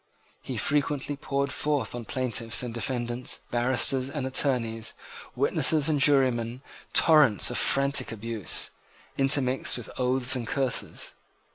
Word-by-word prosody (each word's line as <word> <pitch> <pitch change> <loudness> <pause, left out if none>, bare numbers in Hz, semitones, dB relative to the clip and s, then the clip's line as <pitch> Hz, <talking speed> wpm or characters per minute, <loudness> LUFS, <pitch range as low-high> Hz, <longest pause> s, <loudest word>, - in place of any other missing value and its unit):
He - - -6
frequently 145 0 0
poured 140 0 -3
forth 145 -7 -1
on 120 -1 -7
plaintiffs 120 -1 0
and 120 -2 -5
defendants, 120 +1 -3
barristers 130 +2 +2
and 140 -2 -4
attorneys, 120 -5 -1 0.4
witnesses 155 -1 +3
and 150 -2 +1
jurymen, 130 -3 +2 0.3
torrents 150 - +4
of - - -1
frantic 140 -2 +2
abuse, 115 -4 -2 0.4
intermixed 135 -2 +1
with 120 - -9
oaths 130 0 +2
and 120 -3 -4
curses. 135 -2 -2
130 Hz, 120 wpm, -26 LUFS, 120-140 Hz, 0.4 s, torrents